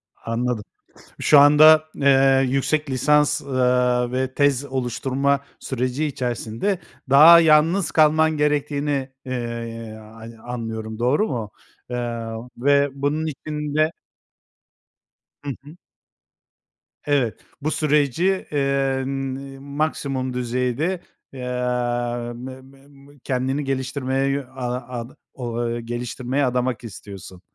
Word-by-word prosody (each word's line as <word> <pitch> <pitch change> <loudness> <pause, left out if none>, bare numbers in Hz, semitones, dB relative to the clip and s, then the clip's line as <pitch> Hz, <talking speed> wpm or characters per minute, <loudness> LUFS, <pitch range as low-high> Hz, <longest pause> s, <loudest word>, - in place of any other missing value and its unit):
Anladım. 115 -1 -2 0.6
Şu 150 - +6
anda, 155 +2 +7
eee, 135 -1 +4
yüksek 145 +3 0
lisans, 145 +3 +2
ııı, 125 -2 +1
ve 130 0 -2
tez 145 -1 +2
oluşturma 135 +2 -1 0.2
süreci 130 +3 -2
içerisinde 130 - -2 0.3
daha 155 +5 +9
yalnız 160 +3 +4
kalman 155 0 +4
gerektiğini, 145 -2 0 0.2
eee, 115 -3 -5 0.2
ayn 115 0 -10
anlıyorum, 110 -2 -6
doğru 135 - +2
mu? 115 -6 -4 0.4
Eee, 120 -2 -3 0.3
ve 140 +2 +3
bunun 145 +3 -1
için 150 0 -5
de 155 +1 +3 1.5
Hı 145 - -4
hı. 150 +4 -13 1.3
Evet, 140 -6 0 0.2
bu 155 +2 -1
süreci, 155 +6 +1
eee, 135 -2 0
n 135 0 -3
iii, 135 -1 -10
maksimum 140 -2 -2
düzeyde, 125 +8 -1 0.3
emm, 120 -1 -2
mı 130 0 -8
mı 135 +1 -19
mı 140 0 -19
kendini 130 +2 -1
geliştirmeye, 130 0 -1
yö 140 0 -2
a 125 -1 -5
ad 115 +1 -7 0.2
ola 120 -2 -5
ııı, 120 0 -2
geliştirmeye 125 +3 -2
adamak 125 -1 -1
istiyorsun. 95 -4 -10
135 Hz, 110 wpm, -22 LUFS, 125-145 Hz, 1.5 s, daha